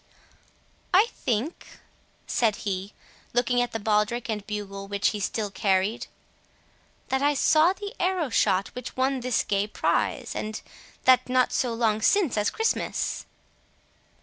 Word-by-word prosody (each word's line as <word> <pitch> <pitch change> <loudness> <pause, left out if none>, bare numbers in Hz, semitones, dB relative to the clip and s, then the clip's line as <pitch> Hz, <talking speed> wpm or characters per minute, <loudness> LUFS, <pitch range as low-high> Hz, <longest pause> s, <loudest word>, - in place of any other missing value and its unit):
"I 420 +5 +6
think," 245 +8 -3 0.5
said 225 -4 +1
he, 195 0 -3 0.4
looking 245 +1 +2
at 245 0 -1
the 225 - -3
baldric 215 +2 0
and 210 -2 -3
bugle 200 -2 -5
which 200 0 +1
he 210 - -4
still 205 +1 -2
carried, 195 +3 0 1.0
"that 265 0 +1
I 290 +1 +3
saw 315 +5 +4
the 405 +2 -7
arrow 360 -7 0
shot 190 -2 +2
which 250 0 -8
won 265 +1 +1
this 250 -1 0
gay 200 0 0
prize, - - -1
and 215 0 -4 0.4
that 255 -1 +5
not 255 0 +2
so 245 - +1
long 225 -2 +1
since 360 - +3
as 210 -1 +1
Christmas." 445 0 -1
230 Hz, 140 wpm, -26 LUFS, 210-265 Hz, 1.0 s, I